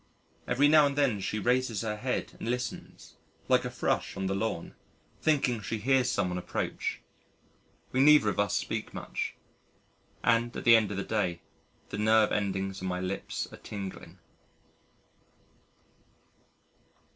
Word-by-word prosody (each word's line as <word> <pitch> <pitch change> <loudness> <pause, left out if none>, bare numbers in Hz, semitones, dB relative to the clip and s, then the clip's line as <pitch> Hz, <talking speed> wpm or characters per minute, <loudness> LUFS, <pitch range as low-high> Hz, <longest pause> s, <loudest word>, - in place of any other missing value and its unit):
Every 145 +4 +4
now 150 -1 +6
and 140 - -3
then 135 -8 +2
she 95 +3 -2
raises 120 -1 +1
her 110 -2 -2
head 125 +3 -3
and - - -4
listens 125 0 -5 0.3
(like - - +3
a - - -2
Thrush - - -1
on 95 - -2
the 95 - 0
lawn) 100 -4 -3 0.5
thinking 135 -7 +2
she 110 - -3
hears 130 +3 +2
someone 90 -6 0
approach. - - -3 0.9
We 130 - 0
neither 145 -5 +6
of - - -3
us 100 -2 +1
speak - - -3
much... - - -4 0.9
and 115 0 +2
at - - -5
the 115 -1 +8
end 110 -3 +3
of 100 - -4
the 100 - -1
day, 95 -6 -1 0.5
the 100 - -5
nerve 110 0 +4
endings 95 -1 -1
on 95 - -3
my 90 0 -2
lips 95 +1 -3
are - - -9
tingling. 100 -2 -8
110 Hz, 145 wpm, -29 LUFS, 95-125 Hz, 0.9 s, the